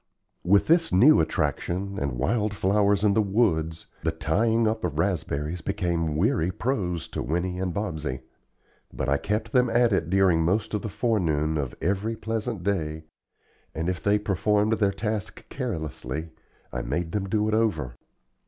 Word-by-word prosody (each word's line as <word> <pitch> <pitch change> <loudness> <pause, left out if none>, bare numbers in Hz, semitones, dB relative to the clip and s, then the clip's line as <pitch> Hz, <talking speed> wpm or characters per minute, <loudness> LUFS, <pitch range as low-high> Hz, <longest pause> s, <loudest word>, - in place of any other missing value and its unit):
With 100 +3 +4
this 165 +1 +3
new 130 +12 +6
attraction, 90 +4 -1
and 70 -2 -2
wildflowers 100 - +1
in 105 -2 +4
the 110 - +3
woods, 95 -7 0 0.2
the - - 0
tying 110 +9 +1
up 110 +1 -1
of 80 -4 -2
raspberries 80 -2 -1
became 85 -4 -1
weary 100 - +2
prose 95 - -2
to - - -4
Winnie 90 +3 -2
and 95 -1 -1
Bobsey; 80 -9 -3 0.7
but 65 - -3
I 70 +1 +3
kept 110 +7 -2
them 125 0 +3
at 120 -1 +3
it 85 -4 0
during 95 -3 +4
most 95 +8 0
of 105 - 0
the 110 - -4
forenoon 85 -9 0
of 70 -5 -3
every 100 +5 0
pleasant 110 -3 -3
day 80 -5 -1 0.7
and 80 +2 -2
if 90 -1 -2
they 100 +1 +3
performed 105 +2 +1
their 100 -2 +3
task 105 0 -4
carelessly, 80 - -4 0.4
I - - -2
made 85 -1 -2
them 100 0 -2
do 105 +1 +1
it 110 - 0
over. 85 - 0
95 Hz, 160 wpm, -26 LUFS, 80-110 Hz, 0.7 s, new